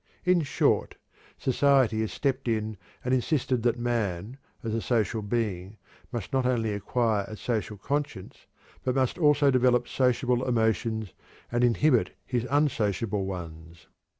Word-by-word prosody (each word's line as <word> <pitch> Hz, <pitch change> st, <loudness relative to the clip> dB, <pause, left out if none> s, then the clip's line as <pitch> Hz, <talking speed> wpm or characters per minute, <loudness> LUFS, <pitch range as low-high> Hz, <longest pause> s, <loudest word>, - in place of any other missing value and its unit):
In 180 Hz, -1 st, +4 dB
short, 145 Hz, -, +1 dB, 0.4 s
society 130 Hz, -4 st, +3 dB
has 110 Hz, -, -2 dB
stepped 135 Hz, -3 st, -1 dB
in 110 Hz, -1 st, -1 dB, 0.3 s
and 125 Hz, -, +1 dB
insisted 130 Hz, -1 st, +1 dB
that 120 Hz, +1 st, +1 dB
man, 115 Hz, -1 st, -2 dB, 0.2 s
as 110 Hz, -1 st, -2 dB
a 115 Hz, -, -1 dB
social 115 Hz, -2 st, 0 dB
being, 105 Hz, -3 st, -2 dB, 0.3 s
must 120 Hz, -2 st, -5 dB
not 130 Hz, -1 st, +2 dB
only 115 Hz, -4 st, +1 dB
acquire 105 Hz, 0 st, 0 dB
a 110 Hz, -, -8 dB
social 110 Hz, -3 st, -2 dB
conscience 140 Hz, -4 st, -4 dB, 0.4 s
but 130 Hz, 0 st, 0 dB
must 130 Hz, +5 st, 0 dB
also 150 Hz, -3 st, +4 dB
develop 125 Hz, -1 st, +3 dB
sociable 125 Hz, -1 st, +1 dB
emotions 110 Hz, -3 st, 0 dB, 0.4 s
and 120 Hz, 0 st, +1 dB
inhibit 125 Hz, +2 st, +3 dB
his 125 Hz, -1 st, -2 dB
unsociable 110 Hz, -8 st, +1 dB
ones. 85 Hz, -2 st, -8 dB
120 Hz, 135 wpm, -27 LUFS, 110-130 Hz, 0.4 s, In